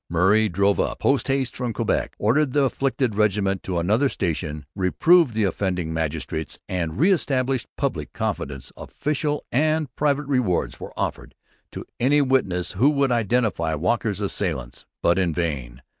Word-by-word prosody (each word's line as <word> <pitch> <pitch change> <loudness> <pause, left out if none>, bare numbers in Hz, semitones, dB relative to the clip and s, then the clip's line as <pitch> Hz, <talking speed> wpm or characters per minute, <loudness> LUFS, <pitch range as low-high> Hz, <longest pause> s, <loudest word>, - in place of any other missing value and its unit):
Murray 95 +6 +3
drove 100 +3 +2
up, - - 0
post 140 0 +1
haste, 135 -2 0
from 125 -2 -3
Quebec, - - -1
ordered 130 +6 +2
the 145 - +3
affected 135 -2 0
regiment 100 -2 +1
to 90 -2 -3
another 110 +11 +2
station, 75 -6 -3
reproved 130 - +3
the 110 - +1
offending 90 -3 -1
magistrates, 80 -1 -3
and 85 -4 -3
re 180 +7 +5
established 135 -7 0
public - - -2
confidence. 65 -2 -4
Official 150 0 -2
and 155 0 +1
private 145 0 +1
rewards 125 -10 0
were - - -8
offered - - -4 0.4
to - - -7
any 140 +5 +4
witnesses 130 -11 +1
who 125 +10 +3
would 140 -3 +1
identify 110 -8 +1
Walker's 105 +5 -1
assailants. 60 -2 -3 0.2
But 85 +2 +3
in 85 -4 0
vain. 65 -8 -3
105 Hz, 150 wpm, -23 LUFS, 85-135 Hz, 0.4 s, re